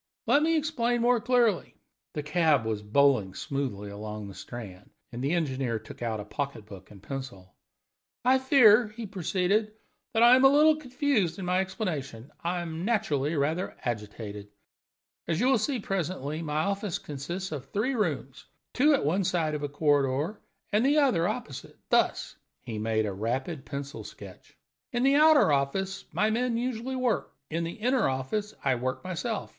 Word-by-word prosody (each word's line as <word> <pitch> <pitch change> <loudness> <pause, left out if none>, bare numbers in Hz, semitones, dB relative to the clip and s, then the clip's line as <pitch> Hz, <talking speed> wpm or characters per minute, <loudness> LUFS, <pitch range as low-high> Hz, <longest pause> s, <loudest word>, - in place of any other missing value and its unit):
"Let 285 - +4
me 325 +1 +3
explain 245 -6 0
more 240 -1 +3
clearly." 240 -6 +2 0.4
The 150 - -2
cab 150 -5 +2
was 110 -2 -2
bowling 105 -3 +2
smoothly 105 -4 -4
along 105 0 -6
the - - -9
Strand, 95 0 -9 0.2
and 120 +2 -5
the 140 +4 +1
engineer 135 -8 -1
took 110 - -12
out 115 -2 -2
a 105 - -6
pocket 140 -2 -4
book 95 -3 -12
and 100 -2 -15
pencil. 125 -10 -7 0.7
"I 260 +1 +5
fear," 245 -4 +6
he 220 +2 -8
proceeded, 195 +2 0 0.4
"that 225 - +5
I 240 +1 +9
am 260 - +3
a 270 - +9
little 305 +2 +5
confused 255 - 0
in 190 - -5
my 180 +1 +2
explanation 155 - -4
I 175 +1 -1
am 165 0 -5
naturally 155 - 0
rather 155 +6 -1
agitated. 105 -3 -5 0.8
As 165 0 0
you 245 - +2
will 260 -2 +4
see 255 +4 -1
presently, 170 -6 -3
my 155 -1 -1
offices 200 -1 -2
consist 170 +7 -5
of 145 -4 -5
three 225 +7 -1
rooms, 145 - -2 0.3
two 290 +3 +5
at 265 - -1
one 180 +7 +1
side 170 -4 0
of 150 - -3
a 145 - -3
corridor, 145 +5 +1 0.3
and 210 +2 +3
the 285 +3 +3
other 245 - +3
opposite - - -6
thus." - - +1 0.3
He 110 -2 -5
made 110 0 0
a 100 - -3
rapid 130 - -3
pencil 140 +1 -6
sketch. - - -13 0.3
"In 240 0 0
the 275 +1 +5
outer 300 - +6
office 190 +8 -1
my 215 +1 +1
men 240 +1 0
usually 250 +1 -3
work. 250 -4 -1 0.2
In 165 +2 -1
the 165 +1 -4
inner 245 - +1
office 170 +12 -3
I 135 - +3
work 130 +1 -3
myself. 185 +5 -3
170 Hz, 170 wpm, -28 LUFS, -, 0.8 s, I